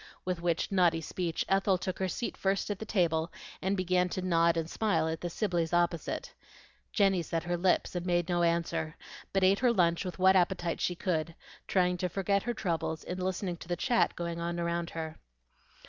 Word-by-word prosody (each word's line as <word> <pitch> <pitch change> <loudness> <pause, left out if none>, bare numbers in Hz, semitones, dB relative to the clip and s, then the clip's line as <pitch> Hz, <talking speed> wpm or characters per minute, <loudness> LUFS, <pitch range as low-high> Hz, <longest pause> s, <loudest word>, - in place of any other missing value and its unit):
With 180 -2 -2
which 170 +1 0
naughty 175 -4 +3
speech 165 +1 -2
Ethel 195 0 +3
took 180 0 -4
her 190 - +1
seat 235 +6 -3
first 195 +2 0
at 205 - -4
the 220 - -5
table, 165 -5 +1 0.3
and 195 +1 0
began 180 0 +2
to 185 - -3
nod 170 -2 +3
and 165 -1 -1
smile 205 -3 +1
at 160 0 -3
the 175 - -2
Sibleys 175 -4 -1
opposite. 175 -1 0 0.6
Jenny 195 -4 +3
set 165 0 -2
her 175 0 -1
lips 180 +1 +1
and 175 - -2
made 175 -1 +1
no 175 -1 +1
answer, 170 -1 0 0.4
but 195 -1 +1
ate 195 +2 +5
her 245 -1 +4
lunch 170 -5 +2
with 180 -2 -5
what 190 +1 +5
appetite 175 -2 +1
she 180 - 0
could, 165 -2 -1 0.3
trying 180 -1 +2
to 180 +1 -1
forget 200 +2 +1
her 240 +3 -2
troubles 165 -5 -2
in 180 +1 -5
listening 185 -1 -2
to 165 - -11
the 175 - 0
chat 240 +5 +2
going 170 -1 -3
on 170 0 -2
around 170 0 -1
her. 160 -1 -6
175 Hz, 200 wpm, -30 LUFS, 170-190 Hz, 0.6 s, ate